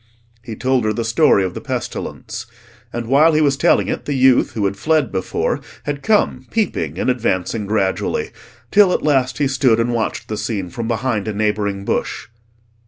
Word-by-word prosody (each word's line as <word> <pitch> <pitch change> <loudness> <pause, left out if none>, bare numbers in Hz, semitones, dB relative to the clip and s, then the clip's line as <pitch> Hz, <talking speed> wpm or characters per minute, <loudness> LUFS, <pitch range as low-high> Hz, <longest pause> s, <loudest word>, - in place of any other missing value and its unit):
He 115 -2 -7
told 130 +1 +1
her 110 0 +1
the 115 0 -3
story 115 -3 +4
of 90 -1 -3
the - - -6
pestilence: - - -5 0.4
and 120 0 -4
while 145 +7 +4
he 155 - +3
was 140 -2 +3
telling 165 +5 +3
it, - - -3
the 145 - -2
youth, 130 -1 +4
who 105 -3 -1
had 100 0 0
fled 150 +3 +1
before, 95 -1 -1 0.2
had 145 -1 -3
come 205 -11 +1
peeping 85 - -1
and - - -1
advancing 110 -4 -1
gradually, 100 -3 -1 0.4
till 200 -3 +5
at - - -1
last 130 -4 +1
he 145 - +2
stood 130 -4 +2
and 120 +1 0
watched 115 -2 -2
the 110 - -4
scene 105 -4 -3
from 115 +5 -4
behind 115 -3 -1
a 110 - -2
neighbouring 100 -2 -1
bush. - - -2
120 Hz, 185 wpm, -19 LUFS, 105-135 Hz, 0.4 s, till